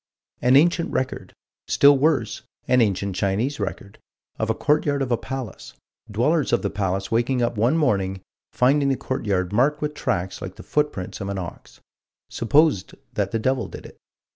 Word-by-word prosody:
An 125 +1 +4
ancient 170 +4 +3
record 130 - -3 0.4
still 140 0 +6
worse, 135 -5 +1 0.3
an 125 -1 +4
ancient 100 -3 0
Chinese 110 +9 -1
record 100 0 -5 0.4
of 110 - -1
a 110 - +1
courtyard 145 0 +1
of 130 - -4
a - - +4
palace 130 -2 -7 0.3
dwellers 135 +8 +1
of 120 - +2
the 100 - -1
palace 95 -1 -2
waking 120 +2 +1
up 120 - 0
one 120 +9 +2
morning, 95 - 0 0.3
finding 140 +2 +3
the 135 - +1
courtyard 100 -8 -2
marked 140 +7 +2
with 150 0 -2
tracks 95 -9 -2
like - - -7
the - - -11
footprints 145 -14 -2
of 100 - -4
an 100 - -3
ox 90 -2 -8 0.5
supposed 140 - +2 0.2
that 100 -2 -1
the 115 - -1
devil 130 +4 0
did - - -10
it. - - -13
120 Hz, 170 wpm, -23 LUFS, 100-140 Hz, 0.5 s, still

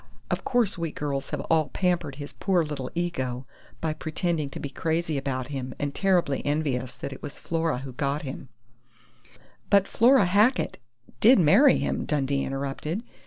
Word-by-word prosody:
Of - - -1
course 230 -7 +1
we 165 -2 -2
girls 140 -2 -3
have - - -3
all 160 -2 +1
pampered 175 -7 0
his 145 0 -8
poor 180 -4 +1
little 140 -4 -5
ego 130 -8 -2 0.4
by 160 -1 0
pretending 155 -1 -2
to - - -7
be 140 - -5
crazy 160 +2 -1
about 135 -2 -3
him 130 -3 -5
and 145 -1 -3
terribly 180 -7 +1
envious 140 -4 -1
that 140 - -5
it - - -11
was 145 - -7
Flora 165 -3 -1
who 130 0 -7
got 140 +3 -1
him 135 -1 -7 0.6
" 120 +3 -29
"But 200 -1 +5
Flora 245 -1 +5
Hackett 210 +8 +2 0.4
did 245 +5 +7
marry 200 - +6
him," - - -1
Dundee 140 -2 0
interrupted. 140 - -3
150 Hz, 165 wpm, -26 LUFS, 135-175 Hz, 0.6 s, did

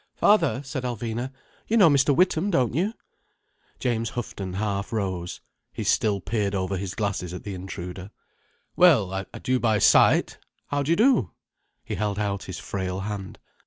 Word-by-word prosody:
"Father," 165 -10 +3
said 135 0 -4
Alvina, 120 +1 -3 0.4
"you 230 - +2
know 195 -6 +7
Mr. 140 -2 +4
Witham, 180 +3 +2
don't 130 - +1
you?" 195 - 0 0.8
James 115 -3 -1
Houghton 100 -6 -5
half 100 +1 -2
rose. 95 -5 -3 0.3
He - - -4
still 105 -2 +2
peered 100 0 -1
over 95 0 -1
his 95 0 -4
glasses 95 -4 -2
at - - -8
the 100 - -5
intruder. 90 0 -7 0.7
"Well—I 100 - +4
do 130 0 0
by 110 -3 +2
sight. - - +4 0.3
How 145 0 0
do 140 - -3
you - - +5
do?" 230 - +4 0.5
He - - -5
held 105 -2 -1
out 100 -2 -2
his 95 - -6
frail 95 -1 -4
hand. 100 -1 -5
105 Hz, 160 wpm, -25 LUFS, 95-135 Hz, 0.8 s, know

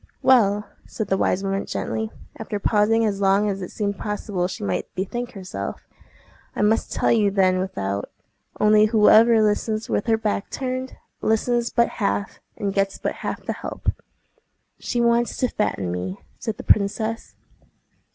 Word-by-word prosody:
"Well," 210 -5 +4 0.2
said 220 - -4
the 195 - +2
wise 190 - +1
woman 195 0 -2
gently, 220 0 -3 0.3
after 215 -2 -4
pausing 220 +2 +3
as 200 -2 -1
long 195 +2 +3
as 195 -1 -2
it 180 - -5
seemed 200 -2 -3
possible 205 -3 -2
she 185 - -7
might 95 -2 -2
bethink 240 +6 -3
herself, 185 - -6 0.7
"I - - 0
must 215 +2 +2
tell - - +1
you 215 -3 +4
then 190 -2 +2
without; 100 - -3 0.5
only 210 0 +5
whoever 220 +1 +6
listens 215 +1 0
with 205 - -1
her 225 -1 +3
back 210 -2 -2
turned, 255 0 -4 0.2
listens 235 +2 +1
but 235 -1 +3
half, 100 0 -1 0.2
and 200 -1 -2
gets 195 0 0
but - - -3
half - - -4
the - - -1
help." - - -3 0.9
"She 240 - -2
wants 235 0 +2
to 255 - +2
fatten 95 - -1
me," 90 +2 -4 0.2
said 220 -3 -4
the - - -8
princess. 220 +2 +1
210 Hz, 160 wpm, -23 LUFS, 195-225 Hz, 0.9 s, whoever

